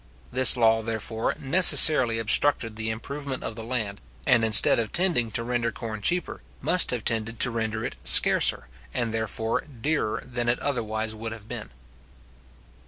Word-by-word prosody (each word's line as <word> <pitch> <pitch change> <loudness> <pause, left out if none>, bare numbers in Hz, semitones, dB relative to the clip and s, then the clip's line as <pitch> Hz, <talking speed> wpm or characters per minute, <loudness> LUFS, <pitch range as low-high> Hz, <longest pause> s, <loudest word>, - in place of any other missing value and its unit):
This 130 0 +6
law, 115 -1 +1
therefore, 110 0 -5
necessarily 135 -6 +6
obstructed 115 0 0
the 110 0 -5
improvement 140 +4 -7
of 110 - -8
the 115 - -10
land, 110 -4 -5 0.2
and, 115 - +1
instead 110 +1 +6
of 110 -2 -5
tending 170 -11 0
to 115 +2 -5
render 120 -1 -4
corn 110 -1 -9
cheaper, 175 - -2 0.2
must 180 0 +1
have 120 -3 -5
tended 115 0 -5
to 125 - 0
render 110 -1 -5
it - - -8
scarcer, - - +3 0.3
and 115 -2 -3
therefore 110 0 -4
dearer, 140 -3 -5
than 120 -1 -5
it 120 - -1
would - - -11
otherwise 110 -5 -4
have 110 -1 -9
been. 115 -3 -9
115 Hz, 160 wpm, -23 LUFS, 110-125 Hz, 0.3 s, This